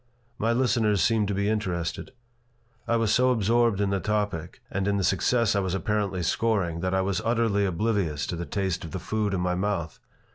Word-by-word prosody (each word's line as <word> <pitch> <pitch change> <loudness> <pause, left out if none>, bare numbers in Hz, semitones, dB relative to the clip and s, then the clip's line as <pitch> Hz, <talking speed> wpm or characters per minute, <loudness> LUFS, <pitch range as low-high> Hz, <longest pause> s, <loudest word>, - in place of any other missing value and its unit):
My 115 +2 +1
listeners 115 -4 +2
seemed 105 +3 +2
to 100 - -1
be 100 +1 0
interested. 90 -6 -2 0.8
I 115 - +2
was 115 -2 +2
so 130 +1 +4
absorbed 115 -2 +2
in 100 -1 +1
the 100 - +1
topic 100 -4 -2
and 100 0 -1
in 100 0 +1
the 95 - 0
success 105 +5 +2
I - - +3
was 95 -1 -1
apparently 100 -2 -1
scoring 95 -4 0
that 95 +2 -1
I 95 - +2
was 95 0 -1
utterly 115 -4 +1
oblivious 90 -6 -1
to - - -3
the 85 +1 -5
taste 95 -4 -2
of 85 - -8
the 95 - -3
food 110 0 -1
in 95 -2 -1
my 90 0 0
mouth. 90 -4 -2
100 Hz, 205 wpm, -26 LUFS, 90-110 Hz, 0.8 s, so